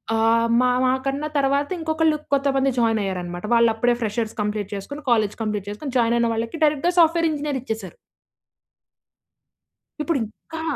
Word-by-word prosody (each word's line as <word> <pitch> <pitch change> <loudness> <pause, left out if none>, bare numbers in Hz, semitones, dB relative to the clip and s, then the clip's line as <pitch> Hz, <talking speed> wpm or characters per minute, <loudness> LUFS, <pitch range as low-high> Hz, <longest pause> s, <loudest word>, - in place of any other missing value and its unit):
ఆహ్, 225 +1 +3
మా, 250 0 +3
మా 255 - +3
కన్నా 275 +2 -1
తర్వాత 280 +1 +1
ఇంకొకళ్ళు 320 -1 +1 0.2
కొంతమంది 275 -1 +2
జాయిన్ 225 -2 +2
అయ్యారనమాట. 180 -1 -4
వాళ్ళు 235 0 +5
అప్పుడే 240 +2 +2
ఫ్రెషర్స్ 220 0 -2
కంప్లీట్ 210 -1 -2
చేసుకొని 285 +10 -7
కాలేజ్ 215 -4 +2
కంప్లీట్ 210 -2 -2
చేసుకొని 260 +6 -6
జాయిన్ 235 -1 +2
అయిన 235 0 +2
వాళ్ళకి 230 +6 -3
డైరెక్ట్‌గా 305 +3 +2
సాఫ్ట్‌వేర్ 330 0 +4
ఇంజినీర్ 290 -2 -2
ఇచ్చేసారు. 220 -7 -6 2.1
ఇప్పుడు 320 0 0
ఇంకా 320 +9 -9
240 Hz, 145 wpm, -22 LUFS, 220-285 Hz, 2.1 s, వాళ్ళు